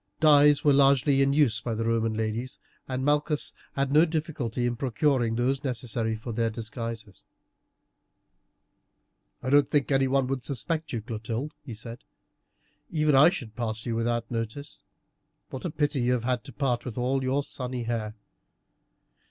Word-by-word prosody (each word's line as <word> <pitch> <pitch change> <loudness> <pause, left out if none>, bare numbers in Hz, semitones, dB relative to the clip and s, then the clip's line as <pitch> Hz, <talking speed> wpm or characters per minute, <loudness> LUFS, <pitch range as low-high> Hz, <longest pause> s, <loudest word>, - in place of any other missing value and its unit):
Dyes 145 -2 +6
were 145 - +5
largely 135 0 +4
in 135 0 +3
use 135 -7 +2
by 120 -1 -3
Roman 115 0 0
ladies, 110 +3 -3 0.3
and 130 0 -3
Malchus 150 +1 +1 0.2
had 140 -1 0
had - - -5
no 150 +3 +6
difficulty 150 -8 -2
in 120 0 0
procuring 125 -1 +1
those 130 +3 0
necessary 115 -3 -2
for 115 +2 -7
their 115 0 0
disguises. 115 - -6 2.2
"I 130 - -2
don't 145 -1 +5
think 145 -1 +1
anyone 135 0 +2
would 130 -1 -3
suspect 155 +4 -2
you, 115 -4 -3
Clotilde," 115 +6 -4
he 120 -6 -8
said; 115 +2 -8 0.9
"even 155 -2 +1
I 140 +5 +8
should 125 - -7
pass 110 -2 -3
you 115 -2 -2
without 115 0 -1
notice. 115 +5 -5 0.7
What 130 - -6
a - - 0
pity 145 -3 0
you 125 +1 +2
have 120 -2 -1
had 125 -2 -1
to - - -9
part 125 -4 -1
with 125 -3 -7
all 130 +2 0
your 135 +2 0
sunny 125 -2 -4
hair!" 110 -2 -3
125 Hz, 160 wpm, -27 LUFS, 115-140 Hz, 2.2 s, I